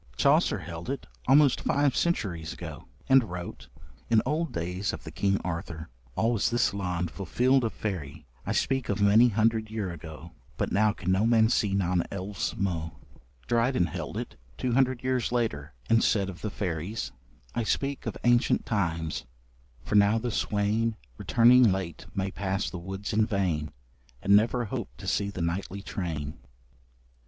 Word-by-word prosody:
Chaucer 145 Hz, -, +4 dB
held 85 Hz, 0 st, -7 dB
it, 140 Hz, -, -3 dB, 0.2 s
almost 140 Hz, 0 st, +5 dB
five 140 Hz, -2 st, +2 dB
centuries 90 Hz, -, -1 dB
ago, -, -, -8 dB, 0.2 s
and 135 Hz, -1 st, +6 dB
wrote: 90 Hz, 0 st, -7 dB, 0.4 s
In 115 Hz, -, +5 dB
olde 155 Hz, +4 st, -1 dB
dayes 90 Hz, +4 st, -2 dB
of -, -, -7 dB
the -, -, -8 dB
Kyng 100 Hz, 0 st, +1 dB
Arthour,... 85 Hz, -3 st, -5 dB, 0.3 s
Al 115 Hz, +2 st, +2 dB
was 115 Hz, -4 st, +1 dB
this 120 Hz, -4 st, +2 dB
lond 90 Hz, -3 st, -2 dB
fulfilled 125 Hz, +8 st, +2 dB
of 115 Hz, -, 0 dB
fayrie;... 90 Hz, -10 st, -4 dB, 0.2 s
I -, -, -3 dB
speke 135 Hz, -2 st, 0 dB
of 100 Hz, -, 0 dB
many 105 Hz, +4 st, +6 dB
hundrid 110 Hz, 0 st, +1 dB
yer 105 Hz, -4 st, -3 dB
ago; 80 Hz, 0 st, -9 dB, 0.3 s
But -, -, -1 dB
now 105 Hz, +1 st, +3 dB
can 95 Hz, -2 st, -3 dB
no 100 Hz, +4 st, +3 dB
man 110 Hz, -1 st, +5 dB
see 100 Hz, -4 st, +1 dB
non 90 Hz, -3 st, +1 dB
elves 100 Hz, +1 st, -3 dB
mo. 85 Hz, -5 st, -2 dB, 0.5 s
Dryden 120 Hz, -, +2 dB
held 85 Hz, -1 st, -5 dB
it, -, -, -6 dB, 0.2 s
two 125 Hz, -, -1 dB
hundred 130 Hz, -1 st, +2 dB
years 130 Hz, -2 st, 0 dB
later, 75 Hz, -, -2 dB
and 115 Hz, 0 st, +4 dB
said 100 Hz, -3 st, +2 dB
of 90 Hz, -, -13 dB
the 105 Hz, -, -2 dB
fairies: 95 Hz, +1 st, -3 dB, 0.4 s
I -, -, 0 dB
speak 135 Hz, +5 st, -1 dB
of -, -, -3 dB
ancient 120 Hz, 0 st, +3 dB
times, 80 Hz, -, -1 dB, 0.6 s
for -, -, -5 dB
now 105 Hz, +1 st, +5 dB
the 120 Hz, +1 st, -2 dB
swain 110 Hz, +2 st, 0 dB, 0.2 s
Returning 120 Hz, -1 st, +6 dB
late 95 Hz, -4 st, -4 dB
may 95 Hz, 0 st, -1 dB
pass 95 Hz, 0 st, -2 dB
the 90 Hz, -, -5 dB
woods 95 Hz, +5 st, -5 dB
in 110 Hz, +1 st, +3 dB
vain, 90 Hz, -8 st, -1 dB, 0.5 s
And 100 Hz, +1 st, +5 dB
never 115 Hz, +3 st, +3 dB
hope 100 Hz, -, -4 dB
to -, -, -10 dB
see 100 Hz, -1 st, 0 dB
the 90 Hz, -4 st, -4 dB
nightly 95 Hz, +3 st, -3 dB
train. 80 Hz, -8 st, -4 dB
100 Hz, 165 wpm, -28 LUFS, 90-115 Hz, 0.6 s, and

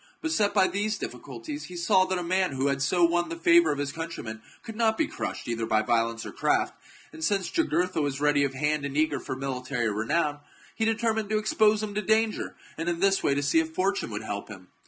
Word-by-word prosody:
Beset 225 Hz, -11 st, +1 dB
by 200 Hz, -2 st, +4 dB
these 210 Hz, +2 st, -1 dB
difficulties, 135 Hz, -, -7 dB
he 180 Hz, -, -10 dB
saw 185 Hz, +2 st, +4 dB
that 185 Hz, 0 st, -1 dB
a 180 Hz, -, -3 dB
man 185 Hz, -1 st, +1 dB
who 135 Hz, 0 st, -2 dB
chap. 140 Hz, -, +3 dB
had 140 Hz, 0 st, -2 dB
so 175 Hz, +6 st, +2 dB
won 175 Hz, 0 st, +1 dB
the 165 Hz, -, -4 dB
favour 170 Hz, -1 st, +5 dB
of 145 Hz, -, -2 dB
his 140 Hz, 0 st, -2 dB
countrymen 150 Hz, -9 st, -6 dB, 0.2 s
could 225 Hz, -, -8 dB
not 225 Hz, -1 st, +2 dB
be 320 Hz, -, +2 dB
crushed 310 Hz, -, -5 dB
either 115 Hz, -1 st, -2 dB
by 110 Hz, 0 st, +2 dB
violence 115 Hz, 0 st, 0 dB
or -, -, -6 dB
craft, -, -, +1 dB, 0.4 s
and 160 Hz, -, -8 dB
since 195 Hz, +2 st, 0 dB
Jugur 330 Hz, -, +2 dB
tha 180 Hz, -3 st, -3 dB
was 140 Hz, -1 st, -1 dB
ready 145 Hz, -1 st, +3 dB
of 135 Hz, -1 st, -1 dB
hand 150 Hz, +1 st, 0 dB
and 140 Hz, 0 st, -3 dB
eager 155 Hz, +1 st, +2 dB
for 130 Hz, -, -5 dB
military 130 Hz, -3 st, -2 dB
renown, 145 Hz, +8 st, 0 dB, 0.3 s
he 225 Hz, -, -1 dB
determined 220 Hz, -1 st, 0 dB
to 215 Hz, -, +2 dB
expose 215 Hz, 0 st, +3 dB
him 210 Hz, -1 st, -4 dB
to 210 Hz, -, -1 dB
danger, 220 Hz, +1 st, +1 dB, 0.2 s
and 165 Hz, +2 st, -2 dB
in 170 Hz, -1 st, -2 dB
this 195 Hz, +1 st, +3 dB
way 140 Hz, -, +2 dB
to 145 Hz, -, 0 dB
see 145 Hz, +3 st, +3 dB
if 160 Hz, 0 st, -2 dB
fortune 195 Hz, -4 st, 0 dB
would 105 Hz, 0 st, -5 dB
help 100 Hz, -2 st, -4 dB
him. 95 Hz, -3 st, -11 dB
165 Hz, 240 wpm, -27 LUFS, 135-200 Hz, 0.4 s, favour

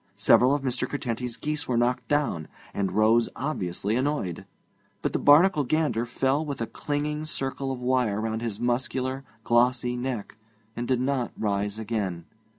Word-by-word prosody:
Several 130 Hz, +3 st, +5 dB
of 145 Hz, -, -3 dB
Mr. 125 Hz, -2 st, -1 dB
Curtenty's 125 Hz, -3 st, -3 dB
geese 150 Hz, 0 st, -2 dB
were 125 Hz, -, +1 dB
knocked 120 Hz, +1 st, +1 dB
down, 145 Hz, -, 0 dB, 0.3 s
and 95 Hz, -2 st, -1 dB
rose 110 Hz, +3 st, +4 dB
obviously 105 Hz, -, -2 dB
annoyed; 130 Hz, -, -1 dB, 0.6 s
but -, -, 0 dB
the -, -, +1 dB
Barnacle 150 Hz, +2 st, +6 dB
gander 125 Hz, -5 st, 0 dB
fell 135 Hz, +5 st, +1 dB
with 145 Hz, -3 st, -5 dB
a 115 Hz, -, -1 dB
clinging 150 Hz, +5 st, -3 dB
circle 135 Hz, -2 st, -3 dB
of 130 Hz, -, -4 dB
wire 125 Hz, -5 st, +1 dB
round 110 Hz, 0 st, -2 dB
his 110 Hz, -3 st, -3 dB
muscular, 130 Hz, +2 st, -1 dB, 0.2 s
glossy 120 Hz, +1 st, +2 dB
neck, 120 Hz, -4 st, -4 dB, 0.4 s
and 120 Hz, 0 st, -3 dB
did 130 Hz, -2 st, +1 dB
not 130 Hz, -2 st, -1 dB
rise 100 Hz, 0 st, -1 dB
again. 100 Hz, -6 st, -3 dB
125 Hz, 155 wpm, -26 LUFS, 110-140 Hz, 0.6 s, Barnacle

